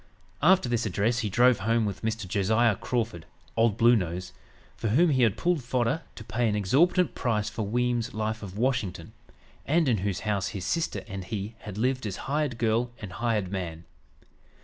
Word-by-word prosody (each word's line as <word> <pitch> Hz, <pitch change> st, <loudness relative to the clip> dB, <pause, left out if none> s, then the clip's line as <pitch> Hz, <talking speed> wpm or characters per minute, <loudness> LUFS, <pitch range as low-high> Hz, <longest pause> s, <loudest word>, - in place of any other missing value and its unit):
After 180 Hz, -1 st, +5 dB
this 120 Hz, -2 st, 0 dB
address 110 Hz, +5 st, +1 dB
he 110 Hz, -3 st, -1 dB
drove 120 Hz, +4 st, +4 dB
home 115 Hz, +3 st, +1 dB
with 100 Hz, -, -4 dB
Mr. 110 Hz, -2 st, -2 dB
Josiah 110 Hz, +4 st, +2 dB
Crawford 110 Hz, -7 st, -3 dB, 0.3 s
"Old 115 Hz, -2 st, +2 dB
Blue 120 Hz, 0 st, +6 dB
Nose" 90 Hz, -2 st, -3 dB, 0.4 s
for -, -, -3 dB
whom 155 Hz, +10 st, +4 dB
he 130 Hz, -2 st, +2 dB
had 115 Hz, -5 st, +3 dB
"pulled 170 Hz, -5 st, +1 dB
fodder" 125 Hz, +4 st, 0 dB
to -, -, -9 dB
pay 115 Hz, +1 st, 0 dB
an 105 Hz, -, 0 dB
exorbitant 155 Hz, -, +3 dB
price 105 Hz, -3 st, -1 dB
for 110 Hz, -3 st, -3 dB
Weems's 120 Hz, +1 st, 0 dB
"Life 110 Hz, 0 st, -2 dB
of 100 Hz, -2 st, -8 dB
Washington," 125 Hz, -6 st, -1 dB, 0.5 s
and 160 Hz, +1 st, +2 dB
in 120 Hz, -4 st, +3 dB
whose 100 Hz, 0 st, -2 dB
house 105 Hz, -3 st, -1 dB
his 95 Hz, -2 st, -5 dB
sister 165 Hz, -1 st, -1 dB
and 95 Hz, -3 st, -6 dB
he 105 Hz, +2 st, -4 dB
had 105 Hz, -2 st, -8 dB
lived 125 Hz, 0 st, 0 dB
as 95 Hz, -, -4 dB
hired 145 Hz, -3 st, -1 dB
girl 115 Hz, +1 st, +1 dB
and 100 Hz, -4 st, -7 dB
hired 110 Hz, -4 st, -1 dB
man. 85 Hz, -4 st, -4 dB
115 Hz, 185 wpm, -27 LUFS, 100-125 Hz, 0.5 s, Blue